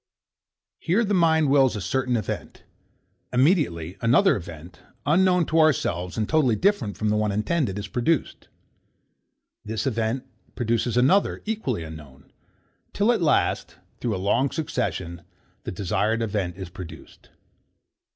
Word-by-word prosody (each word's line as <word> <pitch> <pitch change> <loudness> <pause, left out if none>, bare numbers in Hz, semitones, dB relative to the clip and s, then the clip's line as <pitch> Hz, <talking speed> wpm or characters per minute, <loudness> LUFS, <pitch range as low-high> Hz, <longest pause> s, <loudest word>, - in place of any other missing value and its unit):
Here 195 +8 +1
the 205 - -1
mind 160 -5 +3
wills 135 -4 +4
a - - -3
certain 125 +4 0
event: 110 - -5 0.7
Immediately 125 - +1
another 135 +12 +4
event, 85 -2 -9 0.3
unknown 180 +3 +3
to 160 +2 +1
ourselves, 90 - +1
and 110 -1 0
totally 145 -8 +3
different 190 - 0
from 110 - 0
the 105 - +2
one 105 -1 +1
intended, 105 - -1
is 100 0 -5
produced: 125 +8 -1 1.2
This 110 +4 -3
event 115 0 -1 0.3
produces 115 0 0
another, 145 +11 +3
equally 210 - -2
unknown: 75 -4 -12 0.6
Till 210 +4 +3
at 225 -5 0
last, 150 -4 +1 0.2
through 115 -4 -1
a - - -3
long 115 +8 +1
succession, 95 - -3 0.4
the - - -3
desired 105 +5 0
event 100 -5 -2
is 95 -3 -7
produced. 90 -1 -11
115 Hz, 130 wpm, -24 LUFS, 100-155 Hz, 1.2 s, wills